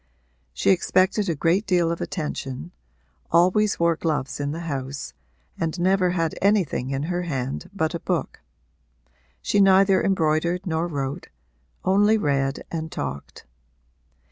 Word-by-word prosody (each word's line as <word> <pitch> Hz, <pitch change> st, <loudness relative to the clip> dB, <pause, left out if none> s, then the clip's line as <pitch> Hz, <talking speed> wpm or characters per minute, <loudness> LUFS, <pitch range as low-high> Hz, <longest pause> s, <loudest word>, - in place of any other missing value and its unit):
She -, -, +2 dB
expected 190 Hz, +2 st, +2 dB
a 165 Hz, -, 0 dB
great 170 Hz, +8 st, +1 dB
deal 175 Hz, -3 st, +2 dB
of 170 Hz, -, -4 dB
attention, 150 Hz, -2 st, -4 dB, 0.6 s
always 185 Hz, +5 st, +3 dB
wore 170 Hz, 0 st, +3 dB
gloves 150 Hz, -5 st, -2 dB
in 145 Hz, 0 st, -2 dB
the 160 Hz, +3 st, -4 dB
house 140 Hz, -3 st, -5 dB, 0.5 s
and 165 Hz, +1 st, -2 dB
never 185 Hz, +1 st, +3 dB
had 165 Hz, -3 st, 0 dB
anything 190 Hz, -10 st, +1 dB
in 135 Hz, +1 st, -2 dB
her 175 Hz, +2 st, -2 dB
hand 135 Hz, -6 st, -4 dB
but 160 Hz, -5 st, -1 dB
a 170 Hz, -, -3 dB
book. -, -, -3 dB, 1.0 s
She 205 Hz, -, +2 dB
neither 195 Hz, 0 st, +5 dB
embroidered 170 Hz, 0 st, +1 dB
nor 165 Hz, -1 st, -1 dB
wrote 140 Hz, -4 st, -4 dB, 0.6 s
only 205 Hz, +3 st, +4 dB
read 135 Hz, -7 st, 0 dB
and 160 Hz, -1 st, -4 dB
talked. 70 Hz, +1 st, -6 dB
170 Hz, 135 wpm, -24 LUFS, 145-190 Hz, 1.0 s, neither